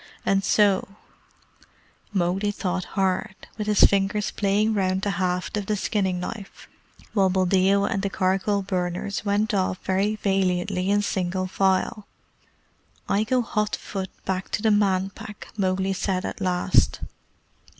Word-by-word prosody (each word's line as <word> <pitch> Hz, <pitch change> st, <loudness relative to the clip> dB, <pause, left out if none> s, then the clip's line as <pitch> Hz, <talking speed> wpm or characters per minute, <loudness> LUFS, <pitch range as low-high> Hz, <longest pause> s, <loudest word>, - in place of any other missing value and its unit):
And 195 Hz, 0 st, +2 dB
so 200 Hz, 0 st, +3 dB, 0.6 s
" -, -, -32 dB
Mowgli 190 Hz, +1 st, 0 dB
thought 185 Hz, -3 st, -2 dB
hard, 190 Hz, +1 st, 0 dB, 0.2 s
with 210 Hz, -, -2 dB
his 210 Hz, -1 st, +3 dB
fingers 200 Hz, +1 st, +3 dB
playing 210 Hz, +2 st, +1 dB
round 190 Hz, -2 st, 0 dB
the 205 Hz, -, +1 dB
haft 180 Hz, +2 st, -1 dB
of 205 Hz, -2 st, -3 dB
the 215 Hz, -, +1 dB
skinning 190 Hz, -3 st, -1 dB
knife, 195 Hz, +2 st, -7 dB, 0.5 s
while 195 Hz, -3 st, +3 dB
Buldeo 190 Hz, +2 st, +3 dB
and 195 Hz, -, -1 dB
the 200 Hz, -, -1 dB
charcoal 195 Hz, +2 st, 0 dB
burners 185 Hz, +1 st, -2 dB
went 210 Hz, +2 st, +1 dB
off 185 Hz, -2 st, 0 dB
very 195 Hz, +3 st, +1 dB
valiantly 190 Hz, -2 st, 0 dB
in 205 Hz, 0 st, +2 dB
single 185 Hz, -1 st, -1 dB
file. 190 Hz, +2 st, 0 dB, 1.0 s
"I 205 Hz, +2 st, +2 dB
go 250 Hz, +2 st, +1 dB
hot 210 Hz, -2 st, -1 dB
foot 190 Hz, -2 st, -5 dB, 0.2 s
back 190 Hz, 0 st, -2 dB
to 210 Hz, -, -1 dB
the 220 Hz, -, +4 dB
Man 195 Hz, -2 st, +2 dB
Pack," 210 Hz, +2 st, -10 dB
Mowgli 190 Hz, -1 st, 0 dB
said 185 Hz, -1 st, -1 dB
at -, -, -5 dB
last. 180 Hz, 0 st, +2 dB
195 Hz, 145 wpm, -24 LUFS, 185-205 Hz, 1.0 s, the